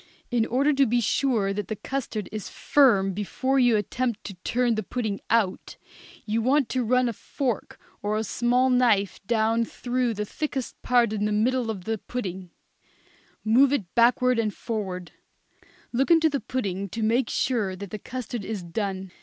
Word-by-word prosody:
In 235 -2 +2
order 275 +5 +2
to 275 -1 +3
be 240 +2 +2
sure 225 -3 +1
that 205 -1 -4
the 215 - -3
custard 230 -3 -4
is 215 -2 -5
firm 205 -9 +3
before 260 +7 0
you 245 -3 +4
attempt 235 +2 -2
to 200 - -6
turn 245 -1 +1
the 215 - -1
pudding 215 -1 -3
out, 215 -5 0 0.5
you 225 +1 0
want 270 +2 +2
to 255 -1 0
run 250 +2 +2
a 235 - -1
fork 245 0 -3 0.2
or 210 +1 -1
a 220 - 0
small 245 +4 +2
knife 210 -7 +2
down 225 0 +2
through 245 0 -2
the 210 +1 -2
thickest 275 +1 -4
part 240 -3 +3
in 210 -1 -1
the 210 - 0
middle 235 +3 +1
of 200 -5 -4
the 220 +2 -2
pudding; 190 -7 -5 1.0
move 255 +5 +5
it 210 -12 -2
backward 245 +1 +4
and 215 -2 -1
forward; 190 -6 -4 0.8
look 265 +6 +1
into 325 -2 +5
the 280 - 0
pudding 200 -5 -3
to 225 +4 -4
make 235 +4 +2
sure 215 -7 0
that 195 0 -8
the 215 - -5
custard 245 -1 -5
is 205 -2 -4
done. 190 +1 -4
230 Hz, 175 wpm, -26 LUFS, 205-250 Hz, 1.0 s, move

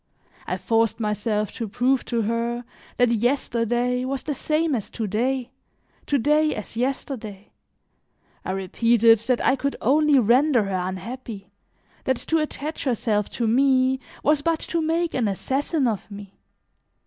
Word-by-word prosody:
I - - -1
forced 225 0 +1
myself 210 -1 -1
to 230 - -4
prove 250 +5 +1
to 235 -2 -1
her 235 +2 -2 0.3
that 245 -1 +3
yesterday 240 0 0
was 265 +1 -3
the 300 - -2
same 310 +3 0
as 225 -6 -2
to 225 - -4
day, 250 +5 -1 0.6
to 285 - +2
day 300 +4 +2
as 215 - -7
yesterday; 230 -5 -4 0.9
I 185 - -3
repeated 225 +4 +3
that 250 +2 0
I 265 - +4
could 280 +1 -2
only 295 +3 +4
render 250 +1 +4
her 185 -2 -2
unhappy, 200 +1 -7 0.5
that 260 -1 +1
to 325 +5 0
attach 305 0 -4
herself 220 -5 0
to 235 - 0
me 260 +2 +3 0.2
was 295 0 +3
but 330 +2 +1
to 335 - -1
make 330 +2 0
an 240 -4 +1
assassin 270 - 0
of 220 -2 -3
me. 200 -1 -10
245 Hz, 150 wpm, -24 LUFS, 220-275 Hz, 0.9 s, I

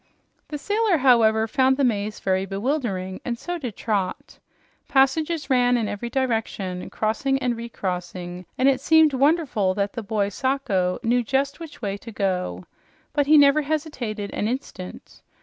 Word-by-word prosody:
The 300 - -5
sailor, 415 +3 +1
however, 230 -5 +4
found 260 +2 +2
the 280 - +1
maze 210 -3 0
very 190 0 0
bewildering, 195 -3 -2
and 235 -1 -3
so 350 +7 -4
did 245 -8 -5
Trot. 200 -5 -3 0.5
Passages 290 +3 +2
ran 245 -2 +3
in 225 -3 -1
every 205 +4 -4
direction, 225 -8 -2
crossing 250 +5 0
and 250 -3 -1
recrossing, 180 -5 -5
and 260 - +3
it 265 -1 +3
seemed 315 0 +5
wonderful 265 - +2
that 200 0 -1
the 235 - -4
boy 205 -1 -1
Sacho 205 -7 0
knew 245 +1 +2
just 275 +5 -1
which 320 -7 -10
way 200 -1 -2
to 230 +3 -10
go. 180 - -2 0.5
But 290 -2 +1
he 305 +1 +7
never 285 +1 +6
hesitated 275 -9 -3
an 210 - -1
instant. 225 -7 -6
240 Hz, 155 wpm, -24 LUFS, 200-275 Hz, 0.5 s, he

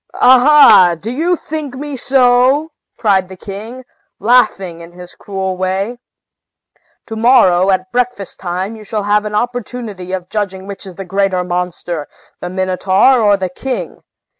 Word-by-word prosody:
"Aha! 255 - +6
do 220 +7 -5
you 330 +7 0
think 305 -5 -6
me 290 +1 -6
so?" 260 +4 +2 0.3
cried 190 -4 +1
the 190 - -11
king, 220 +7 -8 0.3
laughing 205 -7 +1
in 170 +1 -13
his 180 0 -12
cruel 190 -2 -4
way. 190 +6 -2 1.1
"To 225 - -7
morrow, 195 -6 +4
at 185 -1 0
breakfast 245 -5 -2
time, 185 +4 -4
you 215 - -12
shall 210 0 -4
have 210 +1 +1
an 210 0 -4
opportunity 225 -5 -4
of 185 -2 -4
judging 190 -2 -4
which 200 0 -8
is 185 - -10
the 195 - -7
greater 190 -1 0
monster, 175 -3 -4 0.3
the 180 - -5
Minotaur 190 +6 +2
or 205 -2 +3
the 185 -1 -3
king! 255 +8 -5
200 Hz, 150 wpm, -15 LUFS, 185-245 Hz, 1.1 s, Aha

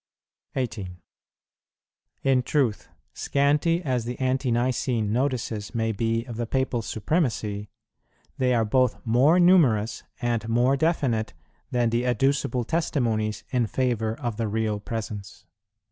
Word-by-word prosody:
18. 100 -9 -4 1.2
In 135 -1 +3
truth, 125 -4 0 0.2
scanty 150 +5 +1
as 130 -6 0
the 120 +2 -5
Ante 130 0 0
nicene 120 -2 0
notices 120 -4 -2
may 115 -1 +1
be 115 +2 -1
of 120 -3 -7
the 120 -1 -2
Papal 130 -1 0
Supremacy, 110 - -1 0.7
they 125 -1 +3
are 115 -1 +2
both 125 +3 +2
more 130 +10 +4
numerous 145 - +4 0.2
and 120 -2 -1
more 120 +4 +3
definite 130 - 0 0.3
than 120 -2 +1
the 120 +1 +1
adducible 125 0 +1
testimonies 115 -9 -1
in 125 -3 +1
favour 115 -1 -1
of 120 -6 -3
the 115 -1 -1
Real 110 0 -1
Presence. 105 -2 -6
120 Hz, 125 wpm, -25 LUFS, 110-130 Hz, 1.2 s, more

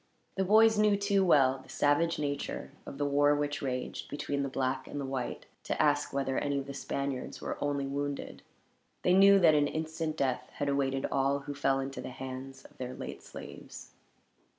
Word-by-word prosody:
The 190 - 0
boys 220 +2 +5
knew, 210 -1 +4
too 200 -1 +2
well, 135 -7 +4
the - - -19
savage 145 +4 +2
nature 145 -1 -3 0.2
of 135 - -7
the 145 - 0
war 145 +1 +4
which 145 0 -2
raged, 130 -2 -4
between 145 -1 -2
the 140 - -1
black 130 0 -2
and 145 - -5
the 140 - -3
white, 130 -2 -4 0.2
to - - -2
ask 145 -1 +2
whether 135 -1 0
any 140 -1 -1
of 135 - -2
the 140 - -7
Spaniards 140 -1 -4
were - - -4
only 140 -1 0
wounded. 140 +1 -4 0.6
They 180 - +4
knew 195 +1 +7
that 170 -5 +6
an 145 -1 +3
instant 160 0 -3
death 130 -2 -1
had 145 - -2
awaited 135 -1 0
all 140 +1 +1
who 145 +1 -6
fell 135 -1 +1
into 135 0 -4
the - - -6
hands 130 +1 -8
of - - -18
their 125 0 -5
late - - -7
slaves. - - -10
140 Hz, 195 wpm, -31 LUFS, 135-150 Hz, 0.6 s, knew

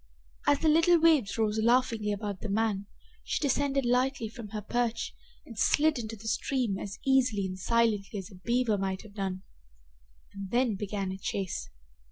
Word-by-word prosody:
As 290 - +5
the 320 - +2
little 330 +2 +5
waves 310 -12 +3
rose 220 -1 +1
laughingly 230 -2 +2
about 205 -2 -4
the 220 - -4
man, 205 -1 0 0.4
she - - -1
descended 280 -1 +1
lightly 250 -1 +1
from 230 -1 -9
her 210 0 -6
perch 235 +1 -1 0.3
and 230 - -11
slid 300 +4 +3
into 225 -1 -5
the 220 +1 -10
stream 235 -4 0
as 200 - -6
easily 255 -7 +3
and 185 0 -5
silently 215 -2 +1
as 195 +1 -7
a - - -12
beaver 235 -3 +1
might 190 -1 -2
have 215 -2 -14
done. 190 -2 -3 0.9
And 200 -1 -7
then 240 -1 +2
began 200 -1 -3
a 190 - -6
chase. 185 - -3
220 Hz, 175 wpm, -29 LUFS, 200-250 Hz, 0.9 s, As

